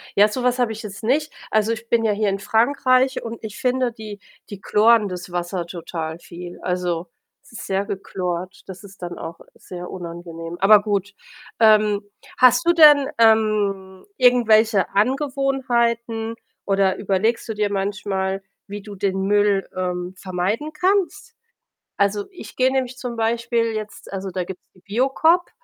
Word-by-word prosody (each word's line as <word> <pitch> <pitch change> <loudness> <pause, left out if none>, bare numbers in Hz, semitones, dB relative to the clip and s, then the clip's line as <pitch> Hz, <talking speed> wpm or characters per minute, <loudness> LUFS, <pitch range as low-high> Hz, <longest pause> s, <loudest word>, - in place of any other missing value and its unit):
Ja, 205 +1 +6
so 245 +4 -4
was 250 0 +1
habe 240 -3 +1
ich 220 +1 -7
jetzt 200 0 -9
nicht. 290 +6 +1 0.2
Also, 220 +1 +1
ich 230 0 -5
bin 230 -1 +2
ja 220 - +2
hier 210 0 0
in 195 0 -2
Frankreich 255 +4 +2
und 230 0 -7
ich 215 -1 -7
finde 255 -1 +1
die 215 -2 -9 0.3
die 200 -2 -9
chloren 220 +1 +4
das 180 0 -7
Wasser 175 0 -3
total 165 -2 -6
viel. 175 0 -10
Also, 180 -1 -2 0.4
es - - -20
ist - - -8
sehr 195 +1 -1
gechlort. 185 -2 -5
Das 190 +1 -10
ist 200 -1 -15
dann 175 -1 -6
auch 165 - -8 0.2
sehr 180 -1 -9
unangenehm. 170 -1 -7
Aber 205 +1 +6
gut, 205 -1 -2 0.4
ähm, 215 -2 +4 0.3
hast 255 +6 +5
du 345 - +6
denn, 295 -4 +7
ähm, 210 -4 +2
irgendwelche 225 -5 +4
Angewohnheiten 235 -2 0 0.3
oder 195 -1 +2
überlegst 205 +4 0
du - - -1
dir 210 -1 0
manchmal, 195 -1 -2 0.2
wie 205 +1 -7
du 210 -1 -9
den 190 -1 -1
Müll, 205 0 +2
ähm, 180 0 -3
vermeiden 190 +11 -3
kannst? 375 +4 0 0.6
Also, 200 0 0
ich 370 - -11
gehe 260 0 +2
nämlich 260 -1 -1
zum 245 -2 -6
Beispiel 230 0 0
jetzt 215 -2 -7
also, 195 0 -4
da 180 0 -3
gibt‘s 185 +1 -9
die 185 - -22
Biocoop 270 - +2
210 Hz, 160 wpm, -21 LUFS, 190-235 Hz, 0.6 s, denn